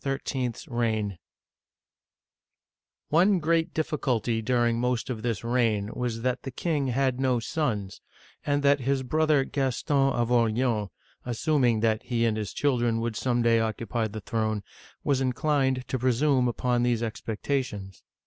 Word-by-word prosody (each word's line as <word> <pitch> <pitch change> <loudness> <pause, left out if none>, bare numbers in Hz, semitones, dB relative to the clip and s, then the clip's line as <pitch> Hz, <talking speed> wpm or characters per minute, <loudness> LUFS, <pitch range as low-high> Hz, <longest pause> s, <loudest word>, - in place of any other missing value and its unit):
'S 135 -3 -3
REIGN 110 -6 -1 1.9
ONE 185 +5 +4
great 165 0 +1
difficulty 125 -7 -1
during 120 0 +1
most 125 +1 -1
of 110 -3 -4
this 115 -2 -2
reign 115 -4 +1
was 115 -2 -3
that 125 0 0
the 135 - -6
king 145 +1 -1
had 130 0 0
no 130 -2 +2
sons, 110 -7 -2 0.4
and 145 0 0
that 140 0 +4
his 135 +1 0
brother 155 +1 +2
Gaston 135 0 0
of 120 -1 0
Orleans, 115 -2 +1 0.3
assuming 125 -2 +1
that 110 -1 +2
he 115 -2 0
and 110 -2 +1
his 105 -2 -3
children 120 -5 +1
would 115 -1 -2
some 120 +1 0
day 115 -1 +4
occupy 110 +1 -1
the 110 0 -7
throne, 110 -1 -1 0.4
was 135 -2 +1
inclined 130 0 0
to 130 - -1
pre 130 +1 +2
sume 130 0 +2
upon 120 0 0
these 120 -1 +1
expectations. 110 -3 -3
125 Hz, 145 wpm, -27 LUFS, 115-135 Hz, 1.9 s, ONE